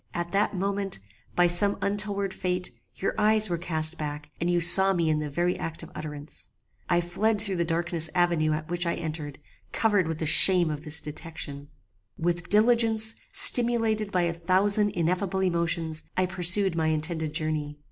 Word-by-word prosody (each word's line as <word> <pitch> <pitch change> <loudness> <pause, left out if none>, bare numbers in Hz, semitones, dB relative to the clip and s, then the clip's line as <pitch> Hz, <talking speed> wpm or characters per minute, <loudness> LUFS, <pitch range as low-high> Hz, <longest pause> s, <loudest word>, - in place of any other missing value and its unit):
At 175 0 -5
that 200 +1 -1
moment, 195 +1 -2 0.4
by 175 - +3
some 175 +4 +5
untoward 200 -1 -3
fate, 180 0 -4 0.2
your 195 - -3
eyes 215 -2 +3
were 170 - -2
cast 160 -1 -1
back, 150 0 -7
and 170 - -2
you 175 0 +1
saw 190 +3 +8
me 170 -3 -1
in 155 - -1
the 150 -1 -5
very 175 +5 -2
act 165 0 -7
of 165 - -12
utterance. 150 -1 -9 0.4
I 175 0 +1
fled 205 +5 -2
through 200 -3 -4
the 170 - -1
darksome 165 -1 -1
avenue 170 -3 0
at 155 0 -5
which 175 0 -2
I 170 - -2
entered, 155 -4 -7 0.3
covered 205 -6 0
with 160 -1 -4
the 160 - -4
shame 175 +1 +5
of 150 0 -7
this 155 +1 +1
detection. 150 -2 -9 0.5
"With 175 +1 -3
diligence, 220 0 +2 0.2
stimulated 235 - +4
by 180 -2 0
a 170 -1 -2
thousand 195 +5 +2
ineffable 185 +3 -2
emotions, 170 -3 -2 0.2
I 185 - +1
pursued 180 +1 +1
my 160 -1 -1
intended 160 0 -2
journey. 155 -2 -3
175 Hz, 175 wpm, -25 LUFS, 160-195 Hz, 0.5 s, saw